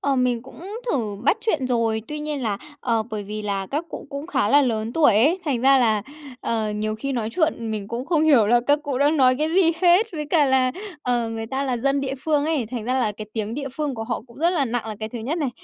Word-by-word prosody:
Ờ, 280 -1 +1
mình 250 -2 +1
cũng 265 +4 -14 0.3
thử 215 -6 -1
bắt 340 - +4
chuyện 315 - 0
rồi. 230 -3 0
Tuy 300 - -4
nhiên 300 -2 -3
là, 210 -4 -1 0.2
ờ, 230 -3 +1
bởi 215 -1 -3
vì 210 +1 -6
là 200 -2 -2
các 295 - -2
cụ - - -8
cũng 280 +2 -5
khá 345 -12 +1
là 285 +5 +6
lớn 225 -3 -1
tuổi 295 -8 +4
ấy, 290 - +4
thành 275 -7 0
ra 270 +2 +5
là, 220 -4 +2 0.4
ờ, 220 -2 -1
nhiều 215 +1 -2
khi 275 +5 -4
nói 230 -4 -1
chuyện 310 -9 0
mình 210 -2 -4
cũng 240 +3 -4
không 325 -3 +2
hiểu 275 -9 +5
là 240 +3 +4
các 290 +1 +4
cụ 280 -3 -2
đang 290 +3 +3
nói 255 -3 +5
cái 305 +1 +1
gì 355 -3 +5
hết. 360 +5 +5
Với 300 -3 -4
cả 315 -4 +4
là, 260 -2 +3 0.3
ờ, 240 -2 0
người 225 0 -4
ta 265 +4 -2
là 260 -3 -1
dân 275 +3 +1
địa 270 -1 -2
phương 300 -2 +2
ấy, 305 -7 0
thành 240 -4 -4
ra 250 +2 0
là 245 -5 +1
cái 215 +1 -8
tiếng 220 0 -3
địa 280 0 -4
phương 285 +1 -3
của 225 -1 -4
họ 230 -1 -3
cũng 235 - -17
rất 335 +3 +3
là 330 -6 +1
nặng 240 -2 -2
là 215 -1 -5
cái 220 - -3
thứ 235 - -6
nhất 270 +10 -2
này, 290 -5 -1
255 Hz, 275 wpm, -23 LUFS, 225-290 Hz, 0.4 s, là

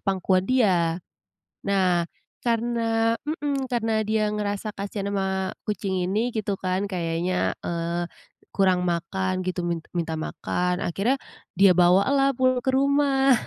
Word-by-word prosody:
pangkuan 190 -1 +1
dia. 180 -10 +3 0.7
Nah, 185 -3 +2 0.4
karena 230 -1 +1
mhm, 290 -3 -2
karena 225 -2 +1
dia 215 -1 +1
ngerasa 210 0 -2
kasihan 200 0 -3
ama 190 -1 -1 0.2
kucing 195 -2 -1
ini 215 +6 0
gitu 210 -2 -1
kan, 185 +2 -1
kayaknya, 175 -1 -1
eee, 170 0 -2 0.5
kurang 185 -2 +3
makan 185 +2 -1
gitu, 185 0 -2
min 170 -1 -1 0.2
minta 165 -1 -1
makan, 180 +3 -2
akhirnya 215 +10 0 0.4
dia 195 0 +7
bawalah 200 +11 +4
pulang 255 -1 +2
ke - - 0
rumah. 275 0 +3
195 Hz, 125 wpm, -25 LUFS, 180-230 Hz, 0.7 s, dia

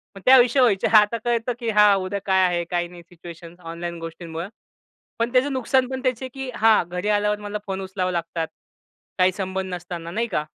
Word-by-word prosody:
मग 195 - -11
त्या 260 +1 +8
विषय 245 +2 +3
व्हायचे. 215 -7 +3
आता 210 +2 +4
कळतं 240 0 0
की 235 - -3
हा 210 -1 +6
उद्या 195 +1 -3
काय 190 -1 +3
आहे 175 -1 0
काय 175 0 0
नाही 175 0 -13
सिच्युएशन्स 170 0 -12
ऑनलाईन 170 0 -6
गोष्टींमुळं. 165 +1 -7 0.7
पण 235 +1 0
त्याचं 265 +2 +2
नुकसान 260 0 +1
पण 260 -1 -4
त्याचे 255 0 -1
की 270 -1 -6
हां, 225 -3 +4
घरी 180 +4 -3
आल्यावर 210 0 +1
मला 210 0 -5
फोन 195 0 -3
उचलावा 185 -1 -3
लागतात. 165 -1 -3 0.7
काही 185 0 +4
संबंध 190 -1 -4
नसताना 175 -1 -6
नाही 230 +6 -1
का? 160 -8 -1
190 Hz, 195 wpm, -23 LUFS, 175-230 Hz, 0.7 s, त्या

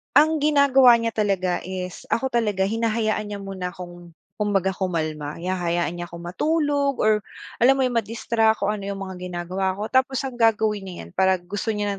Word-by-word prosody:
Ang 310 +1 +5
ginagawa 280 -4 +6
niya 230 0 -1
talaga 195 -5 0
is, 185 -1 -6
ako 265 +2 -1
talaga, 210 -5 +1
hinahayaan 220 0 0
niya 205 - -5
muna 195 -2 -5
akong 175 -2 -10 0.2
kumbaga 195 -2 +1
kumalma. 155 -6 -3
Hinahayaan 175 -1 -1
niya 175 0 -6
ako 170 - -11
matulog 285 - 0
or 215 0 +4 0.4
alam 260 +3 +5
mo 270 - +1
yun, 255 - +1
ma-distract 225 -1 0
o 205 - +2
ano 200 -2 -5
yung 195 -1 -4
mga 190 -1 -8
ginagawa 185 +2 -2
ko 210 +3 -5
tapos 260 0 +2
ang 255 -2 -6
gagawin 215 -3 +2
niyan 130 - -8
'pag 190 - +2
gusto 205 +5 -5
niya 205 0 -1
205 Hz, 175 wpm, -23 LUFS, 180-230 Hz, 0.4 s, ginagawa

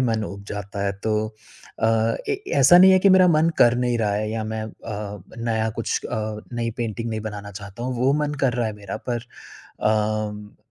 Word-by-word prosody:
मन 115 -3 +1
उब 100 0 -7
जाता 100 0 -4
है, 100 - 0
तो 110 +2 -1 0.6
अ - - +4 0.4
ए, 405 0 -1
ऐसा 140 +6 +7
नहीं 190 +1 +8
है 185 - +6
कि 200 - +4
मेरा 185 -1 +7
मन 160 0 +4
कर 120 0 +6
नहीं 125 -1 +1
रहा 105 -2 +1
है 105 +1 -1
या 110 0 -3
मैं 110 0 -3
अ, 105 -2 -7 0.2
नया 110 -1 0
कुछ 115 - -2
अ, - - -4 0.4
नई 115 -1 -2
पेंटिंग 115 0 -3
नहीं 110 -1 -3
बनाना 105 -1 -6
चाहता 100 +3 -9
हूँ, 130 0 -2
वो 130 +3 +3
मन 150 0 -2
कर 135 -3 +2
रहा 120 -2 0
है 110 - -3
मेरा 100 -2 -6
पर 120 -1 -1 0.6
अ, 105 -1 -1
110 Hz, 205 wpm, -23 LUFS, 105-120 Hz, 0.6 s, नहीं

